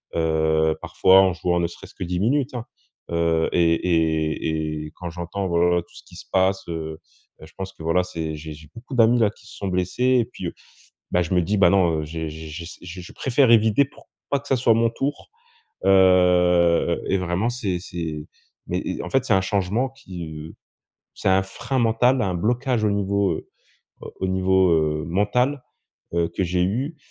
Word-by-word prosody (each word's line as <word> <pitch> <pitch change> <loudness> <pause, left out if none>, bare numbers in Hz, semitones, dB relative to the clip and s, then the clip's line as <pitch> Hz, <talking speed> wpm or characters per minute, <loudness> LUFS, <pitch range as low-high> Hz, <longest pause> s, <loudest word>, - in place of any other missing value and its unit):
Heu, 80 -1 +2
parfois, 95 +1 +5
en 95 -2 +3
jouant 85 0 0
ne 85 - +1
serait-ce 85 - -13
que - - -5
10 90 0 -2
minutes 130 +6 +1
hein, 120 - -4 0.5
heu, 85 -1 +1
et 85 -1 +4
et 80 -2 0
et 75 - -9
quand 90 -1 -6
j'entends, 90 +3 -4
voilà, 85 0 +2
tout - - -26
ce - - -11
qui - - -16
se - - -10
passe, 95 +1 +2
heu, 80 -1 -5 0.4
beh - - -12
je - - -20
pense 95 0 -6
que 80 - -12
voilà, 85 +3 +2
c'est 80 -3 -5
j'ai 75 +1 -8
j'ai 75 0 -14
beaucoup 125 +3 -8
d'amis 120 0 +5
là 110 -3 +4
qui 105 - -21
se - - -12
sont 100 - -4
blessés 95 +8 +1
et - - -2
puis, 110 -6 -7
heu, - - -5 0.6
ben 90 - +2
je 80 - -4
me 90 - +4
dis: 100 +5 -1
«Ben 95 -3 +6
non, 85 -5 +2
j'ai 80 +1 -5
j'ai 80 +1 -8 0.2
j'ai 90 +1 -8
je 90 - -12
préfère 130 -1 +2
éviter 110 +3 +5
pour 135 - -20 0.2
pas 140 - +1
que 140 - -14
ça 135 - +3
soit 115 -2 +4
mon 115 0 +3
tour», 140 +5 -4 0.6
heu, 90 -3 +4
et 95 - +2
vraiment, 90 +6 -1
c'est 100 -7 -2
c'est 80 -4 -5 0.4
mais - - -1
et - - -4
en - - -5
fait, 135 -1 +2
c'est 120 - 0
un 95 - +4
changement 100 +6 0
qui, 95 -11 -9
heu 80 0 -9 0.6
c'est - - -3
un 95 0 +4
frein 130 +7 -4
mental, 120 +3 +3
un 95 -5 0
blocage 120 +5 0
au - - +3
niveau, 100 0 +1
heu, - - -8 0.7
au 95 - -1
niveau, 95 0 +3
heu, 75 -1 +1
mental, 125 +10 0 0.5
heu, 85 -1 +1
que 90 +3 -2
j'ai 90 0 0
eu, 130 - -2
90 Hz, 200 wpm, -23 LUFS, 85-110 Hz, 0.7 s, Ben